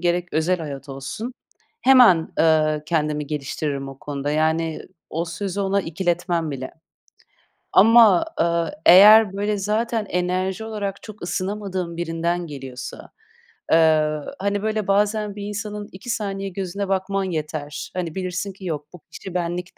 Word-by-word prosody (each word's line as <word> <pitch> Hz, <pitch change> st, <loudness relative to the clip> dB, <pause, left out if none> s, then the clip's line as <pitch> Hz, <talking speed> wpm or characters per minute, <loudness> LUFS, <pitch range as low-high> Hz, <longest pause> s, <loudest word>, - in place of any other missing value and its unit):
gerek 175 Hz, 0 st, 0 dB
özel 165 Hz, +4 st, +1 dB
hayat 145 Hz, -4 st, -7 dB
olsun 140 Hz, -, -6 dB, 0.5 s
hemen, 240 Hz, -11 st, +6 dB
eee, 155 Hz, -1 st, +3 dB
kendimi 150 Hz, -2 st, -1 dB
geliştiririm 140 Hz, -1 st, -3 dB
o 135 Hz, 0 st, -10 dB
konuda, 145 Hz, 0 st, -4 dB
yani, 160 Hz, +1 st, 0 dB, 0.3 s
o 165 Hz, +2 st, -2 dB
sözü 195 Hz, +3 st, -4 dB
ona 195 Hz, 0 st, +1 dB
ikiletmem 175 Hz, -1 st, -1 dB
bile. 130 Hz, -2 st, -5 dB, 1.0 s
Ama, 220 Hz, -3 st, +6 dB
eee, 170 Hz, 0 st, +2 dB, 0.2 s
eğer, 205 Hz, +3 st, +8 dB
böyle, 205 Hz, +1 st, -1 dB
zaten 215 Hz, +2 st, -1 dB
enerji 185 Hz, +3 st, -1 dB
olarak 205 Hz, -3 st, -4 dB
çok 215 Hz, -1 st, -11 dB
ısınamadığım 185 Hz, -1 st, -3 dB
birinden 170 Hz, +1 st, -2 dB
geliyorsa, 135 Hz, -3 st, -8 dB, 0.6 s
eee, 155 Hz, -1 st, +4 dB, 0.3 s
hani, 200 Hz, +1 st, -1 dB
böyle, 215 Hz, -2 st, -1 dB
bazen 205 Hz, +1 st, +1 dB
bir 205 Hz, -, -6 dB
insanın 210 Hz, 0 st, -5 dB
2 190 Hz, +6 st, -10 dB
saniye 195 Hz, -3 st, -2 dB
gözüne 195 Hz, +1 st, -4 dB
bakman 195 Hz, +1 st, -1 dB
yeter. 155 Hz, -4 st, -4 dB
Hani, 175 Hz, -3 st, -3 dB
bilirsin 185 Hz, +1 st, -3 dB
ki: 190 Hz, 0 st, -12 dB
"Yok, 150 Hz, -3 st, -4 dB
bu 180 Hz, -, -11 dB
kişi 190 Hz, -, -9 dB
benlik 175 Hz, 0 st, -3 dB
180 Hz, 135 wpm, -22 LUFS, 160-200 Hz, 1.0 s, eğer